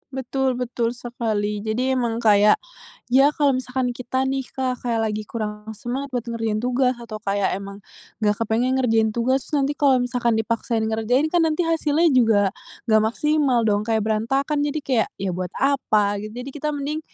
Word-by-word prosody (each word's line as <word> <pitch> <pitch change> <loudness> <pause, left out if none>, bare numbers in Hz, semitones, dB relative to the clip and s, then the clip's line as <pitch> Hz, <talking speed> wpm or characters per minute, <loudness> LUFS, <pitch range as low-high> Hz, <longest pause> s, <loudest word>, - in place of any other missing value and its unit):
Betul 265 0 -1
betul 240 -1 -2
sekali. 215 -4 -2
Jadi 230 +5 -1
emang 235 -3 -1
kayak, 210 -1 +6 0.6
ya 270 +2 +6
kalau 285 -2 +3
misalkan 255 -1 -1
kita 255 +2 -2
nih 265 -1 -2
Kak, 255 -2 -3
kayak 230 -2 0
lagi 215 0 -4
kurang 210 -1 -5
semangat 255 +6 -4
buat 240 - -1
ngerjain 225 -2 -1
tugas 250 0 +1
atau 215 -2 -7
kayak 200 -1 0
emang 200 0 -8 0.5
nggak 210 0 +3
kepengen 240 +4 +1
ngerjain 225 -3 +2
tugas, 255 +4 0
nanti 290 0 +1
kalau 270 -3 +3
misalkan 240 -2 0
dipaksain 225 0 -1
ngerjain 230 +7 +1
kan 340 +1 +2
nanti 325 +1 +1
hasilnya 325 0 +2
juga 225 -4 +4 0.5
nggak 220 -1 +5
maksimal 280 +2 +1
dong, 205 0 +2
kayak 220 -1 0
berantakan, 270 +7 0
jadi 295 +1 -1
kayak 240 -5 +1
ya 195 -1 -2
buat 180 -1 -4
apa 270 -6 +2 0.2
gitu. 215 - -7
Jadi 265 +2 -6
kita 300 +1 -2
mending 290 +2 -3
245 Hz, 170 wpm, -22 LUFS, 220-270 Hz, 0.6 s, kayak